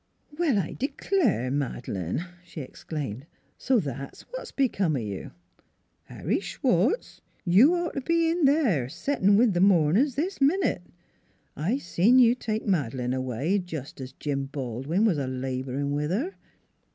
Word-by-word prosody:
"Well, 305 -8 +2
I 180 -6 -1
d'clare, 275 - 0
Mad'lane!" 130 - -3 0.2
she 170 -3 -8
exclaimed; 135 -1 -6
" - - -41
so 260 -2 +2
that's 140 - -6
what - - -7
b'come 200 - +1
o' - - 0
you? 100 -4 -5 0.8
Harry - - -2
Schwartz, - - 0 0.2
you'd 205 - +6
ought 345 -1 -2
t' - - -2
be 335 +4 +1
in 335 -2 +1
there, 245 - +2
settin' 200 - +2
with 230 -2 +4
th' 175 - +1
mourn 175 -4 +4
ers 270 +1 +2
this 340 +4 -2
minute: 300 - +2 0.7
I 185 - 0
seen 210 +2 +3
you 240 -2 +7
take 220 -3 -3
Mad'lane 130 - 0
away, 130 - -1
jes' 155 -6 -6
as 130 0 -8
Jim 140 -1 -3
Baldwin 135 - -2
was 180 -9 +2
a 135 - -2
laborin' 130 +2 -3
with 150 +1 -1
her." 265 - -1
175 Hz, 150 wpm, -26 LUFS, -, 0.8 s, you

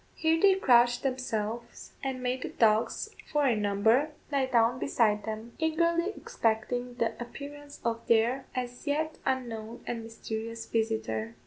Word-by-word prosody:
Here 325 0 +2
they 390 -1 +6
crouched 245 -8 +4
themselves, 235 -3 -3
and 260 -2 -3
made 250 +1 -1
the - - -3
dogs, 220 -1 +2 0.2
four 295 -2 +2
in 230 -5 +2
number, 220 +8 +3 0.2
lie 275 -2 +2
down 240 0 +3
beside 215 -6 +2
them, 220 +2 -5
eagerly 335 +3 +2
expecting 245 +2 -1
the 230 -2 0
appearance 285 +4 -8
of 230 0 -2
their 235 +4 +3
as 250 +2 -4
yet 310 +2 -1
unknown 235 -3 -3
and 235 -1 -3
mysterious 225 0 -5
visitor. 115 - -1
240 Hz, 140 wpm, -29 LUFS, 225-275 Hz, 0.2 s, they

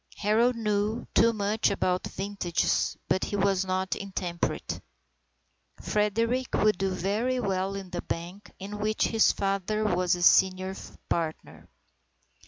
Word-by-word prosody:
Harold 225 +4 +2
knew 215 +1 -1
too 230 +1 +5
much 215 0 +1
about 180 0 0
vintages, 195 -3 -1
but 185 - +1
he - - -4
was 195 -1 +2
not 185 0 -1
intemperate. 185 -3 -3 1.0
Frederick 230 +5 0
would 215 -3 +2
do 195 0 +1
very 210 +8 -1
well 195 -3 -1
in 190 -2 -7
the 175 - -3
bank 175 +5 -6
in 205 +2 -7
which 215 +1 +1
his 225 -1 +4
father 195 +2 -1
was 180 -3 +2
a 175 - -3
senior 185 +1 +4 0.3
partner. 160 -2 -4
200 Hz, 130 wpm, -28 LUFS, 185-215 Hz, 1.0 s, too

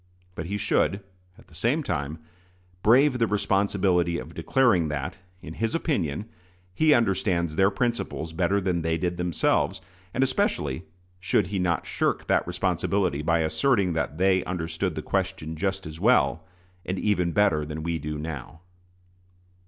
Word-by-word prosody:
But 80 -2 -5
he 100 +3 -2
should, 105 -1 +1 0.4
at 115 - -18
the - - -22
same 120 - 0
time, 70 - -3 0.6
brave 130 +5 +4
the 115 - +3
responsibility 95 -4 +1
of - - -8
declaring 120 -12 +2
that, 75 +3 -4 0.2
in 80 - -7
his 115 - -2
opinion, 105 - -1 0.5
he 155 +10 +3
understands 95 -7 +1
their 95 +2 +4
principles 100 -6 -2
better 95 +4 +1
than 90 -3 0
they 80 0 0
did 90 +1 -2
themselves; 90 -2 +1 0.3
and 130 - +1
especially 95 - 0 0.3
should 95 +1 +1
he 95 - 0
not 85 -2 0
shirk - - -1
that - - +1
responsibility 90 -2 0
by 85 +1 +2
asserting 100 - +2
that 80 -2 -2
they 95 0 +3
"understood 85 0 -2
the 80 - -4
question 95 -5 -2
just 95 +3 -2
as 80 +1 -8
well, 100 -7 +3 0.4
and 95 +2 -3
even 90 -4 +1
better, 90 -6 +3
than 75 +1 -5
we 85 0 -1
do 75 0 -4
now." 75 0 -7
90 Hz, 155 wpm, -26 LUFS, 80-100 Hz, 0.6 s, brave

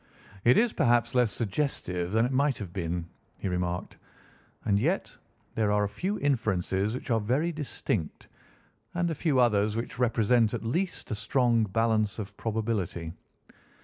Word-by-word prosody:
"It 120 +2 +5
is 235 0 +3
perhaps 120 0 +2
less 125 -4 +3
suggestive 95 -7 -2
than 110 +2 +3
it 125 - -1
might 140 +1 +2
have 95 -5 -7
been," 85 -2 -2 0.3
he - - -4
remarked, 90 -1 -2 0.7
"and 100 -1 +3
yet - - 0 0.4
there 110 -2 +1
are 105 0 +3
a - - +1
few 185 - -2
inferences 110 -6 0
which 125 - -5
are 115 - +3
very 130 +11 0
distinct, 125 - -3 0.7
and 175 -1 +1
a - - 0
few 150 -3 +1
others 105 -3 +3
which 115 +2 -4
represent 115 -1 +3
at 115 - -5
least 175 +11 -2
a - - +1
strong 115 +1 +2
balance 110 0 +1
of 105 -1 -6
probability. 105 -8 -2
115 Hz, 155 wpm, -28 LUFS, 100-125 Hz, 0.7 s, It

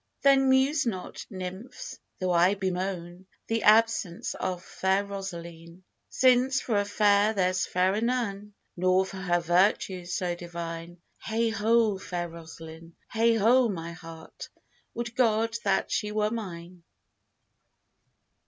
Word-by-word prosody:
Then 270 -1 +5
muse 265 +1 +3
not, 185 -5 -5
Nymphs, 190 +4 -7 0.2
though 185 -1 0
I 175 +3 +4
bemoan 185 -1 -4 0.2
The 225 0 -1
absence 215 -5 +3
of 180 -1 -4
fair 190 +1 0
Rosaline, 170 -3 -8 0.3
Since 255 +1 +3
for 215 -4 0
a 205 - 0
fair 205 +1 +3
there's 185 -1 +1
fairer 185 +4 +1
none, 210 -4 -2 0.2
Nor 185 +1 +2
for 190 - -9
her 175 -2 +1
virtues 180 +1 +1
so 180 -1 -1
divine: 170 0 -7 0.2
Heigh 225 +1 -1
ho, 220 -1 +2
fair 175 -2 -4
Rosaline; 165 0 -11 0.2
Heigh 230 0 +2
ho, 235 +3 +4
my 170 -4 -5
heart! 165 -1 -11 0.5
would 235 0 -4
God 230 -2 +2
that 195 -1 +1
she 210 -1 -1
were 210 0 0
mine! 180 -5 -7
190 Hz, 125 wpm, -27 LUFS, 175-225 Hz, 0.5 s, Then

